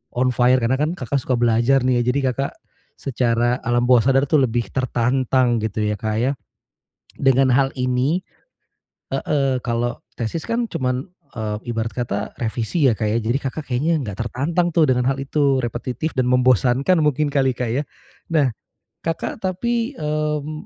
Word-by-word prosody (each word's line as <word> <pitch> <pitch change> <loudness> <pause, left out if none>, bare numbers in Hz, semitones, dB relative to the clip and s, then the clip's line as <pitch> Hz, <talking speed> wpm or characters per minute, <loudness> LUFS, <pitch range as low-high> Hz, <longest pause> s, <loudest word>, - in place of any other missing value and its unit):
on 130 +1 +2
fire 125 +1 +3
karena 130 +3 +1
kan 155 +4 0
Kakak 135 -2 -2
suka 130 0 -1
belajar 120 +3 +3
nih 125 -1 +2
ya. - - +1
Jadi 125 +3 +2
Kakak 135 +2 -3 0.4
secara 120 -1 0
alam 120 0 +2
bawah 125 -1 +5
sadar 135 0 +4
tu 150 +2 +3
lebih 120 -3 0
tertantang 130 -1 +1
gitu 110 0 -2
ya, 105 -1 -1
Kak, 110 -1 -2
ya 135 - +2 0.9
dengan 135 -1 +3
hal 135 +2 +3
ini. 130 +7 +1 0.9
Heeh, 135 -3 0
kalo 120 0 -2
tesis 120 +8 -3
kan 235 +1 0
cuman, 125 0 -2 0.3
eee, 110 -2 -3 0.2
ibarat 115 0 -1
kata 110 -3 -3
revisi 115 - 0
ya, - - +2
Kak, 110 - -1
ya. 110 - +1
Jadi 115 +4 0
Kakak 145 +3 -4
kayaknya 150 +7 +1
nggak 100 -3 -6
tertantang 165 +8 0
tuh 160 -3 +5
dengan 125 -1 +2
hal 135 - 0
itu, 140 0 +1
repetitif 125 +5 -3
dan 130 - +2
membosankan 125 - +3
mungkin 150 0 +1
kali, 135 -2 +2
Kak, 125 -2 -2
ya. 140 - 0 0.5
Nah, 145 -5 +4 0.6
Kakak 165 +5 -3
tapi, 235 +7 -1
mmm, 150 0 -2
130 Hz, 165 wpm, -21 LUFS, 120-145 Hz, 0.9 s, bawah